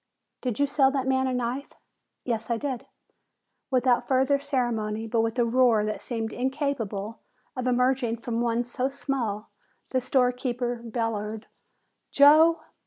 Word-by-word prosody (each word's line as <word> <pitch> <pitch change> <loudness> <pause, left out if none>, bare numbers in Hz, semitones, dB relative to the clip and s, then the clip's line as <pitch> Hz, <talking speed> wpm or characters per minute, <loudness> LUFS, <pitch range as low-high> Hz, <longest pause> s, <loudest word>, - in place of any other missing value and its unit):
"Did 245 -4 -2
you 285 - +4
sell 275 -1 +3
that 270 -2 -1
man 265 0 +1
a 260 - -1
knife?" 250 +3 -3 0.5
"Yes, 225 -2 -2
I 235 - +1
did." 260 -1 -4 0.8
Without 255 -2 +2
further 265 +1 +3
ceremony, 225 -6 -1
but 225 0 +1
with 225 +2 -2
a 240 - +3
roar 235 -3 +3
that 215 - -3
seemed 225 -2 -4
incapable 245 -6 -3 0.4
of 255 0 -3
emerging 250 -1 +1
from 235 0 -3
one 235 0 +1
so 250 +2 -2
small, 245 -6 -3 0.4
the 255 - +1
storekeeper 250 -1 0
bellowed, 220 -2 -3 0.6
"Joe!" 310 +4 +6
245 Hz, 140 wpm, -26 LUFS, 230-265 Hz, 0.8 s, Joe